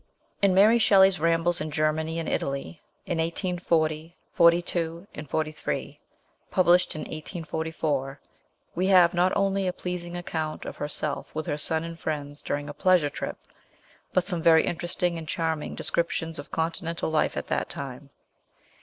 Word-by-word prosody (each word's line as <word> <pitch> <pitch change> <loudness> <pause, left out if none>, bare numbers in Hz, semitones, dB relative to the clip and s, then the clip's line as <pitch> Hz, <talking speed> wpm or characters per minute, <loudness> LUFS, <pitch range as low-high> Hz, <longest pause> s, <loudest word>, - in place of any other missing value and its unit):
IN 195 -2 +4
Mary 215 +5 +6
Shelley's 190 -3 +5
Rambles 165 +1 +2
in 155 - -3
Germany 155 +1 0
and 165 - -3
Italy 140 +4 -3 0.2
in 170 - -2
1840 165 -2 0 0.2
42 170 0 +2 0.2
43, 155 +2 -3 0.5
published 180 -1 +3
in 155 - -4
1844, 155 -4 -3 0.5
we 185 +2 0
have 180 -3 +6
not 180 +1 +3
only 195 -1 +1
a - - +1
pleasing 180 -1 -5
account 160 -3 -4
of - - -7
herself 145 0 -3
with 155 - -2
her 145 - -2
son 160 +2 0
and 165 0 -7
friends 145 -2 -4
during 145 0 -3
a 145 - -6
pleasure 180 -6 +3
trip, - - -5 0.7
but 185 - +2
some 175 -3 -1
very 160 -1 +6
interesting 175 0 -1
and 160 - -9
charming 160 -1 -2
descriptions 165 -1 -2
of 145 - -8
continental 165 0 -2
life 155 - +1
at - - -3
that - - -2
time. 140 0 -7
165 Hz, 145 wpm, -26 LUFS, 155-175 Hz, 0.7 s, Mary